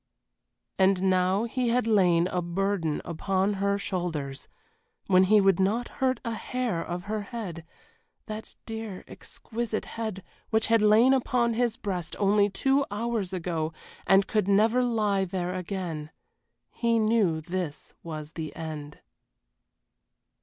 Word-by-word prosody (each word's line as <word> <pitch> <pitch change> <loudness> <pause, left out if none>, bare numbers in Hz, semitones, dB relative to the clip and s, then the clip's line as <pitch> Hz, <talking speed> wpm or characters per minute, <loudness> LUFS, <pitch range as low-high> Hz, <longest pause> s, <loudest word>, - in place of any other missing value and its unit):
And 190 0 +4
now 185 +3 +2
he 240 +1 -1
had 245 +1 +2
laid 180 -6 +4
a 180 - -1
burden 175 -2 -1
upon 190 +4 0
her 200 0 +2
shoulders, 160 -8 -3 0.6
when 185 -1 +5
he 210 +2 +5
would 195 -2 +4
not 215 +6 +1
hurt 260 -2 +2
a 230 - -1
hair 235 -6 -2
of 175 0 -5
her 215 +2 -3
head 200 -7 -6 0.6
that 215 0 -7
dear, 220 -4 -6
exquisite 230 -1 -4
head 220 -5 -5 0.3
which 220 -1 +2
had 230 -1 +3
lain 220 +5 +6
upon 245 -2 +2
his 235 -1 0
breast 180 -5 -3
only 205 0 +3
two 270 +7 +2
hours 215 -2 -2
ago, 165 -3 -2 0.3
and 195 0 +5
could 210 -3 0
never 220 +5 +4
lie 210 -5 +1
there 180 -1 -2
again. 180 -4 -4 0.6
He 230 -1 +1
knew 215 -7 +2
this 170 -2 -5
was 155 -2 -7
the 160 -2 -6
end. 150 -2 -7
195 Hz, 135 wpm, -27 LUFS, 175-225 Hz, 0.6 s, lain